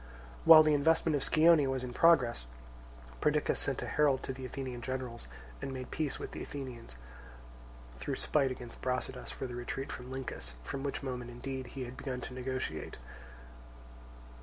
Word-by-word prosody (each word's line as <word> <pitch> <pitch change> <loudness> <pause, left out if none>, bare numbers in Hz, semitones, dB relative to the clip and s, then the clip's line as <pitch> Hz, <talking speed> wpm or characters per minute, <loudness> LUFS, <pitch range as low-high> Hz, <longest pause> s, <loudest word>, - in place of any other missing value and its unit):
While 160 -1 +11
the 155 -1 +4
investment 160 +2 +3
of 140 - 0
Scione 160 -2 +6
was 130 -1 -1
in 125 -1 -5
progress, 125 - +4 0.7
Perdiccas 150 0 +2
sent 135 -2 0
a - - -3
herald 145 -3 +3
to 130 - -3
the 130 0 -6
Athenian 130 -2 -5
generals 125 - -4 0.3
and 135 - -3
made 130 -1 -6
peace 155 -3 -1
with - - -6
the - - -6
Athenians, 125 - -7 1.0
through - - -2
spite 140 -3 +2
against 125 -2 -8
Brasidas 130 0 -2
for - - -5
the 125 - -5
retreat 120 +2 -4
from 125 0 -7
Lyncus, 120 - -5
from 135 - -4
which 140 0 -3
moment 125 -2 -4
indeed 130 +1 -5
he 130 - -2
had 125 +1 -9
begun 130 -2 -4
to 125 - -6
negotiate. 130 -11 -4
130 Hz, 165 wpm, -33 LUFS, 125-140 Hz, 1.0 s, While